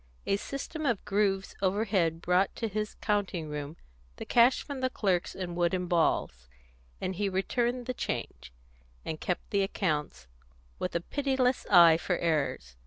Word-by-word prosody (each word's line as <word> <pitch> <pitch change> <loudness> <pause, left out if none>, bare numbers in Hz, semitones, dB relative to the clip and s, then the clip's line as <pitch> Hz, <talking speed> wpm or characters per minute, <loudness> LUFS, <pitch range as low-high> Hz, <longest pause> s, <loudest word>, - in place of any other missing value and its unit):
A 195 - +2
system 280 +7 -5
of 235 -6 0
grooves 195 -1 0
overhead 190 -4 +1
brought 180 +2 +2
to 225 - -2
his 215 0 -3
counting 195 -7 -1
room 150 +2 -5 0.4
the - - -7
cash 245 +2 +4
from 285 -2 -6
the 260 - +1
clerks 190 -8 0
in 180 -2 -4
wooden 175 +1 0
balls, 155 - 0 0.5
and 185 - -2
he 205 0 0
returned 240 +6 -1
the 255 - -2
change, 65 - -5 0.5
and 155 -1 -4
kept 180 - -3
the 200 - +2
accounts, 155 - -2 0.5
with 180 - -3
a 170 - +1
pitiless 265 +2 0
eye 170 -4 +8
for 180 +1 -1
errors. 140 - -1
190 Hz, 155 wpm, -29 LUFS, 165-215 Hz, 0.5 s, eye